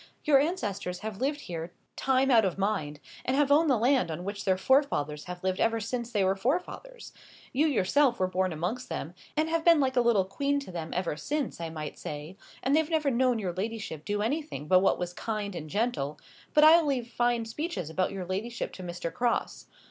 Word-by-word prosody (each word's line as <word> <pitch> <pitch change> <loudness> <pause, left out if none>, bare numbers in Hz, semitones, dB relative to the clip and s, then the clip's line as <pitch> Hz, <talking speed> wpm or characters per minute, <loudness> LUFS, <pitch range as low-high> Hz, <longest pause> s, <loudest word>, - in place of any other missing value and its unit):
Your 285 -3 +5
ancestors 205 - -2
have 215 0 -6
lived 290 +2 0
here 170 0 -6 0.2
time 265 0 +2
out 230 -3 +6
of 190 -3 -1
mind, 190 -8 -1 0.2
and 255 - 0
have 285 -1 +3
owned 310 +2 +5
the 260 - +4
land 250 -2 +2
on 160 +2 -4
which 200 +1 -5
their 190 -1 +3
forefathers 185 - +1
have 180 0 -7
lived 185 0 0
ever 225 0 +2
since 235 +2 -4
there 205 -4 +2
were 190 +1 +2
forefathers. 360 - -3 0.4
You 295 +5 +3
yourself 260 +1 +2
were 185 - +3
born 185 0 0
amongst 180 +11 -3
them, - - -4 0.2
and 310 +1 +2
have 325 0 0
been 335 -2 +6
like 265 -2 +1
a 245 - +5
little 230 -5 +3
queen 280 +8 0
to 275 - -9
them 165 -2 -5
ever 180 -4 -1
since, 280 - -3
I 165 - -3
might 155 -2 -6
say, 150 +4 -6 0.3
and 270 +2 +3
they've 315 0 +2
never 310 -4 +1
known 250 0 +2
your 190 -5 -3
ladyship 200 -5 -4
do 205 +2 -1
anything 285 - -3
but 185 +3 +6
what 190 - +3
was 175 0 -4
kind 210 0 -3
and 155 -3 -6
gentle; 205 - -1 0.4
but 300 - +7
I'll 320 0 +7
leave 255 -4 0
fine 240 -1 0
speeches 225 - -4
about 185 +3 0
your 195 -2 -5
ladyship 220 +7 -4
to - - -9
Mr. 175 -1 -5
Crosse. 240 -1 -1
225 Hz, 210 wpm, -29 LUFS, 185-275 Hz, 0.4 s, but